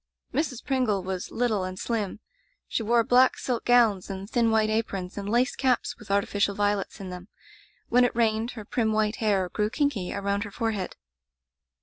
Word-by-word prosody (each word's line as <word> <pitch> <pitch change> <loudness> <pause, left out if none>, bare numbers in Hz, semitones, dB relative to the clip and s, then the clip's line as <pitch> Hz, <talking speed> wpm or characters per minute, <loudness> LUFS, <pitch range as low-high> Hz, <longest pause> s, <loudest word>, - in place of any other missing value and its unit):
"Mrs. 275 -6 -2
Pringle 250 -9 +1
was 185 -1 -4
little 225 -5 0
and 185 0 -5
slim. 215 -2 -3 0.5
She - - -1
wore 230 +1 +3
black 250 +3 +4
silk 245 -3 -2
gowns 230 -6 +4
and 195 0 -5
thin 230 +1 +2
white 220 -1 +2
aprons, 195 -4 -2
and 200 0 -4
lace 245 +4 +2
caps 255 -3 +1
with 210 - -13
artificial 200 0 +1
violets 205 0 -1
in 190 -2 -6
them. 180 +1 -8 0.6
When 250 +1 +5
it 245 - +1
rained, 225 0 +1
her 215 -3 -8
prim 220 0 0
white 215 0 +1
hair 200 -4 +1
grew 210 +4 0
kinky 240 -9 -1
around 200 +1 -1
her 205 - -7
forehead. 210 -3 -3
215 Hz, 180 wpm, -26 LUFS, 200-235 Hz, 0.6 s, When